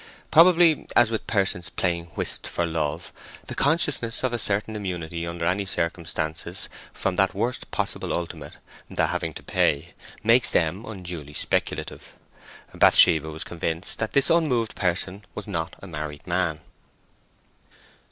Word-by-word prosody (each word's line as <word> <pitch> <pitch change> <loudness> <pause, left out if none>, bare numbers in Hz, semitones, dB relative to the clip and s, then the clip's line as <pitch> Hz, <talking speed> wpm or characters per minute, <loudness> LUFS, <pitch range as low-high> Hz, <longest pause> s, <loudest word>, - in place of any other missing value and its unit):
Probably, 170 -1 +6
as 120 -2 +5
with 110 - -3
persons 95 -4 0
playing 85 -2 -1
whist - - +1
for 85 - -1
love, 80 -3 -3 0.3
the - - -6
consciousness 140 -6 +1
of 130 -2 0
a 120 - -1
certain 105 +1 -1
immunity 85 -4 -4
under 85 0 -3
any 95 +3 0
circumstances 85 -3 -3 0.2
from 95 -2 -2
that 95 -1 +3
worst 120 +5 -2
possible - - -2
ultimate, 85 -1 -4 0.4
the - - +1
having - - -2
to - - -9
pay, 70 - +1 0.3
makes 115 +3 +5
them 85 +6 +1
unduly 90 -8 -7
speculative. - - -2 0.6
Bathsheba 80 0 +6
was 80 0 -6
convinced 85 +1 -3
that 110 - -2
this 140 - +3
unmoved 130 -9 +2
person 90 +2 -1
was 105 - -5
not 85 -5 -3
a - - -7
married 75 -3 -6
man. 85 -3 0
90 Hz, 140 wpm, -25 LUFS, 85-115 Hz, 0.6 s, Probably